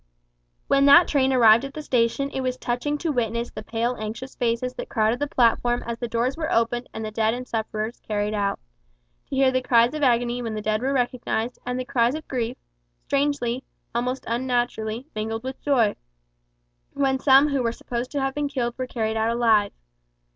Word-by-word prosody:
When 275 0 +4
that 325 +5 +8
train 270 -2 +2
arrived 230 -2 +6
at 275 0 -7
the 305 - -5
station 255 +2 +1
it 265 - -3
was 255 -1 -2
touching 250 +5 -2
to 325 +1 -2
witness 235 -2 -1
the - - -7
pale 230 +3 -2
anxious 225 +5 -6
faces 245 +1 -1
that - - -7
crowded 220 +1 +1
the 290 - -1
platform 240 -1 +2
as 235 0 -4
the 240 - -3
doors 235 +3 0
were 320 0 -3
opened 235 +2 0
and 220 - -5
the 215 - -5
dead 220 +1 +1
and 250 0 -7
sufferers 220 0 -3
carried 210 0 -2
out; 200 -1 0
and - - -43
to - - -3
hear 265 -1 +4
the 255 0 +1
cries 240 0 +4
of 305 - -4
agony 245 -2 +2
when 225 -2 -4
the 215 - -3
dead 215 +1 0
were 265 +2 0
recognised, 245 -2 -1
and 250 0 -2
the 255 - -3
cries 245 0 +1
of 310 - -7
grief, 245 -2 -3 0.5
strangely, 275 -3 0 0.3
almost 250 +2 -2
unnaturally, 240 -1 -1
mingled 225 +1 -3
with 260 +1 -6
joy, 245 -8 +2 1.0
when 270 -1 +1
some 275 +2 +6
who 280 -2 0
were 230 -1 0
supposed 240 +1 -5
to 285 - -2
have 270 0 -1
been 295 0 -2
killed 240 -4 -2
were 255 - -2
carried 220 -3 -2
out 220 +1 +1
alive. 225 -3 +3
240 Hz, 200 wpm, -24 LUFS, 225-265 Hz, 1.0 s, that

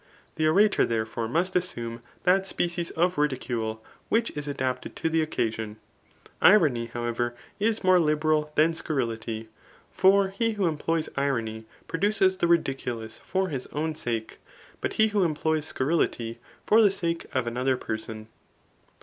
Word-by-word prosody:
The 155 0 +1
orator, 200 +6 +4
therefore, 115 0 -1
must 170 +9 0
assume 120 -10 -2 0.2
that 190 +2 +3
species 175 -2 -1
of 175 -1 0
ridicule, 120 -6 -2 0.2
which 230 +1 +2
is 150 -1 -6
adapted 130 -3 -3
to 160 - -1
the 165 0 +3
occaaon. 110 -7 -2 0.7
Irony, 150 - +5
however, 120 0 -2 0.2
is 220 +1 +1
more 185 -1 +6
liberal 155 -1 +1
than 160 +2 +4
scurrility. 115 -8 -3 0.4
For 195 +1 +4
he 225 +4 0
who 205 -3 0
employs 165 0 0
irony, 115 -6 -1 0.2
produces 190 +1 +2
the 170 - +1
ridiculous 135 -9 -1
for 190 0 -1
his 135 -5 -4
own 155 +2 -2
sake; 115 -6 -4 0.4
but - - -2
he 220 0 +3
who 205 -2 +2
employs 155 -1 0
scurrility, 125 -6 -1 0.3
for 220 +2 +6
the 210 - +6
sake 170 -3 -2
of 130 -2 0
another 125 +2 0
person. 110 -1 -5
150 Hz, 140 wpm, -27 LUFS, 120-180 Hz, 0.7 s, more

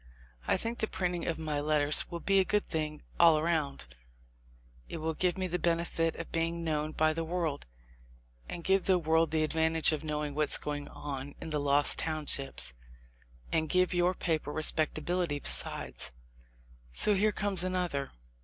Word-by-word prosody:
I - - +3
think 230 +1 -4
the 220 - 0
printing 180 -3 -2
of 165 - -1
my 155 -2 -2
letters 150 0 +5
will 170 - -5
be 195 0 +3
a - - +5
good 210 +2 0
thing 155 -2 -3 0.2
all 165 -2 +7
around 155 - -1 0.5
— - - -29
it - - -5
will 160 0 -2
give 180 +3 0
me 185 - -1
the 180 0 -2
benefit 165 -1 0
of 165 - -8
being 165 +1 -1
known 155 -1 -2
by 155 0 +2
the 165 +1 -3
world, 160 - -3 0.8
and 170 - -6
give 190 +1 +2
the 190 -1 +4
world 160 -1 +2
the 155 0 +1
advantage 160 +1 +2
of 155 -1 -3
knowing 150 -1 -3
what's 150 0 +3
going 145 -1 -5
on 140 -1 -7
in 160 - -6
the 150 - 0
Lost 145 0 +4
Townships, 150 - -1 0.8
and 160 -1 0
give 185 0 +2
your 175 +1 +2
paper 160 -4 -2
respectability 155 +1 0
besides. 65 - -2 0.8
So 210 - +4
here 210 +2 +2
comes 200 -4 0
another. 180 -7 -2
160 Hz, 170 wpm, -30 LUFS, 150-175 Hz, 0.8 s, all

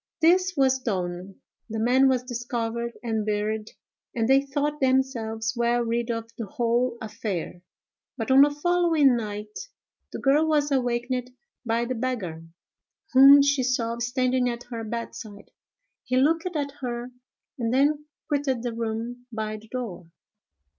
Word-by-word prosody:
This 365 +3 +3
was 265 -1 +3
done, 185 -4 -3 0.3
the 220 - -4
man 255 +4 +4
was 255 -1 +1
discovered 235 -1 -3
and 220 -2 -1
buried, 215 +1 -2 0.5
and 225 -2 +1
they 270 +1 +5
thought 290 +2 -2
themselves 235 -4 0
well 240 0 +1
rid 235 +1 -1
of 230 -1 -3
the 225 - -4
whole 235 +3 0
affair; 200 -6 -5 0.6
but, 225 +1 -2
on 265 +1 +8
the 290 - +7
following 320 -3 +3
night, 210 - -6 0.4
the - - -5
girl 290 +4 +3
was 295 -2 +1
awakened 250 -1 -1 0.3
by 235 0 0
the 255 - -2
beggar, 225 -10 -3 0.7
whom 275 +2 +9
she 280 -1 +2
saw 235 -2 -1
standing 250 +1 +1
at 240 0 -5
her 230 -1 -4
bedside. 220 -2 -7 0.5
He 255 -1 -1
looked 325 +6 +2
at 285 -2 -1
her, 240 -1 -4 0.5
and 230 -1 -1
then 290 +3 +2 0.2
quitted 275 -4 -1
the 240 -2 -2
room 230 +2 -4
by 215 -1 -3
the 220 +1 -15
door. 220 -8 -6
245 Hz, 145 wpm, -25 LUFS, 225-270 Hz, 0.7 s, whom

